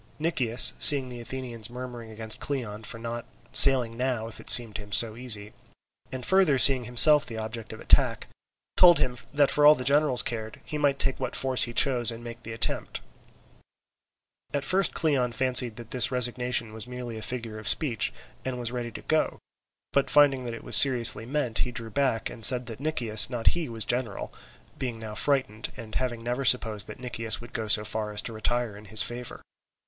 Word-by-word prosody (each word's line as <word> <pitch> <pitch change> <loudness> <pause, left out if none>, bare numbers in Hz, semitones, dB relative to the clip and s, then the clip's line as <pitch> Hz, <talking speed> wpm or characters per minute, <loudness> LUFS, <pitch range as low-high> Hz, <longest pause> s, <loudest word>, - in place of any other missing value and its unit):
Nicias, 130 -7 +2
seeing 135 -3 +10
the 120 -1 -10
Athenians 120 -2 -7
murmuring 120 -2 -10
against 110 0 -3
Cleon 115 -7 -6
for 110 - -7
not 115 +1 -7 0.3
sailing 125 -4 +5
now 125 -2 -4
if 115 - -10
it - - -5
seemed 115 -4 +7
to - - -9
him 100 0 -16
so 110 +1 +4
easy, 110 -4 -2 0.6
and 130 -2 -7
further 190 -7 +1
seeing 130 -1 +6
himself 145 +5 +6
the 115 - -9
object 110 0 -8
of 110 - -11
attack, - - +1 0.5
told 175 -2 +5
him 125 -1 -2 0.2
that 145 -1 +1
for 150 - 0
all 150 +1 +6
that 125 - -7
the - - -5
generals 145 -2 +2
cared, 110 -2 -6
he 150 - -6
might 140 -2 0
take 135 -1 -3
what - - -6
force 130 -1 +2
he 120 - -9
chose 125 -4 +2
and 115 0 -6
make 120 0 -11
the 115 - -11
attempt. 115 - -4 1.5
At 140 - -3
first 185 +3 -1
Cleon 135 -7 -2
fancied 125 -1 +2
that 115 0 -13
this 125 -3 +1
resignation 125 -2 -3
was 110 +1 -7
merely 125 -2 -9
a - - -11
figure 115 -2 -7
of 110 - -6
speech, 120 -10 +1 0.3
and 130 -1 -6
was 120 -1 -4
ready 120 -1 -6
to - - -11
go, - - -2 0.6
but 140 - -1
finding 140 -3 +2
that 120 -1 -7
it - - -13
was - - -1
seriously 120 -4 +4
meant, 130 -4 -3
he 125 - -3
drew 115 -1 -7
back, 125 -2 -2
and 115 - -11
said 125 +1 +5
that 115 -1 -10
Nicias, 120 -9 +1
not 120 -3 -1
he, 170 -5 -5
was 115 -3 -4
general, 120 -2 -5 0.5
being 125 -3 -6
now 110 -1 -10
frightened, 110 -4 -3
and 115 -3 -12
having 120 -3 -5
never 125 +3 -4
supposed 110 -5 0
that - - -12
Nicias 115 -3 -3
would 120 -1 -14
go 110 -1 -5
so 105 0 +2
far 105 0 -5
as 105 0 -1
to 115 - -7
retire 115 0 -3
in 105 +1 -15
his 110 +2 +1
favour. 120 0 -8
120 Hz, 205 wpm, -24 LUFS, 115-130 Hz, 1.5 s, seeing